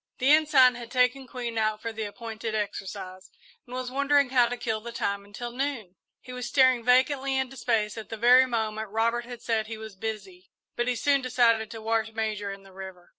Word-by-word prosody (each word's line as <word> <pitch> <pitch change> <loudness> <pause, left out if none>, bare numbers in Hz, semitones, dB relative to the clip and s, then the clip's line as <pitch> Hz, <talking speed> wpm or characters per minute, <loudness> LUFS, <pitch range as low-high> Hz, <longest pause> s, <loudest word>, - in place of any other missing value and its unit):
The 260 +3 +3
Ensign 295 -5 +6
had 235 -1 -9
taken 255 +1 +1
Queen 240 -3 -4
out 215 -1 0
for 230 +1 -5
the 220 0 -4
appointed 220 +1 -6
exercise 195 -2 -5 0.4
and 250 - -8
was 255 0 -4
wondering 280 0 +2
how 245 -2 +5
to 245 +1 -4
kill 220 -2 -2
the 235 +2 -7
time 200 -3 -2
until 205 +4 -7
noon. 245 -8 -4 0.2
He 255 - -11
was 250 -1 -5
staring 255 -2 +4
vacantly 265 +2 +3
into 265 0 -2
space 225 -4 -1
at 220 - -10
the 225 - -5
very 250 +3 +6
moment 220 -3 -2
Robert 230 +3 0
had 240 -1 -9
said 220 -2 0
he 225 0 -6
was 220 -2 -9
"busy," 195 -3 -7 0.3
but 240 0 -1
he 250 - +1
soon 280 +3 +2
decided 235 -3 +2
to 225 +1 -8
wash 225 0 0
Major 215 -2 -2
in 195 0 -9
the 195 -1 -17
river. 190 -2 -10
230 Hz, 210 wpm, -27 LUFS, 215-250 Hz, 0.4 s, Ensign